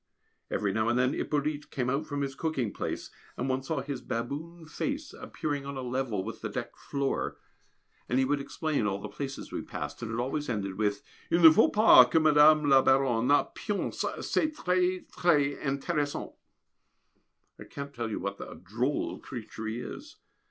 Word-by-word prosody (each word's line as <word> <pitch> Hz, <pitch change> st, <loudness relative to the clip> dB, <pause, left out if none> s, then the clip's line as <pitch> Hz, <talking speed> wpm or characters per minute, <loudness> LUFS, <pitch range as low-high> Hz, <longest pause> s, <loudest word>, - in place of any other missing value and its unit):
Every 100 Hz, -2 st, 0 dB
now 110 Hz, +2 st, +1 dB
and 120 Hz, -, +2 dB
then 125 Hz, +1 st, +2 dB
Hippolyte 150 Hz, 0 st, -2 dB
came 125 Hz, -2 st, -2 dB
out 140 Hz, +5 st, -1 dB
from 145 Hz, -1 st, -3 dB
his 135 Hz, -1 st, -2 dB
cooking 135 Hz, -8 st, -2 dB
place, -, -, -4 dB, 0.3 s
and 125 Hz, -, -2 dB
one 130 Hz, 0 st, 0 dB
saw 140 Hz, +1 st, -2 dB
his 140 Hz, -2 st, -5 dB
baboon 150 Hz, +9 st, -5 dB
face 285 Hz, -, -4 dB
appearing 145 Hz, -2 st, -4 dB
on 140 Hz, 0 st, -6 dB
a 130 Hz, -, -4 dB
level 125 Hz, -5 st, -2 dB
with 115 Hz, +2 st, -7 dB
the 110 Hz, -, -3 dB
deck 120 Hz, +2 st, -5 dB
floor, 140 Hz, -1 st, -2 dB, 0.7 s
and 125 Hz, -, +1 dB
he 130 Hz, -, +3 dB
would 145 Hz, +2 st, +1 dB
explain 145 Hz, -5 st, -1 dB
all 100 Hz, -1 st, -1 dB
the -, -, -6 dB
places 135 Hz, -1 st, -6 dB
we -, -, -3 dB
passed, 75 Hz, +7 st, -6 dB
and 115 Hz, -1 st, -4 dB
it 115 Hz, -, -2 dB
always 135 Hz, +4 st, -2 dB
ended 100 Hz, -5 st, -2 dB
with: 105 Hz, -1 st, 0 dB, 0.3 s
"Il 170 Hz, -, +3 dB
ne 160 Hz, -, +12 dB
faut 155 Hz, -, +5 dB
pas 210 Hz, -, +8 dB
que 160 Hz, -, +4 dB
Mme. 155 Hz, 0 st, +6 dB
La 135 Hz, -1 st, +7 dB
Baronne 130 Hz, -3 st, +3 dB, 0.3 s
pionce 205 Hz, -1 st, -3 dB, 0.2 s
c'est 310 Hz, -, +1 dB
très 185 Hz, -5 st, +1 dB
très 145 Hz, -5 st, +2 dB
intéressant." 145 Hz, +1 st, -2 dB, 1.3 s
I -, -, -8 dB
can't 140 Hz, 0 st, -7 dB
tell 120 Hz, -3 st, -3 dB
you 110 Hz, -, -3 dB
what 100 Hz, 0 st, -4 dB
a -, -, -8 dB
drôle 125 Hz, +7 st, -2 dB
creature 110 Hz, -3 st, -7 dB
he 115 Hz, +3 st, -3 dB
is. 300 Hz, -, -8 dB
135 Hz, 180 wpm, -29 LUFS, 120-150 Hz, 1.3 s, ne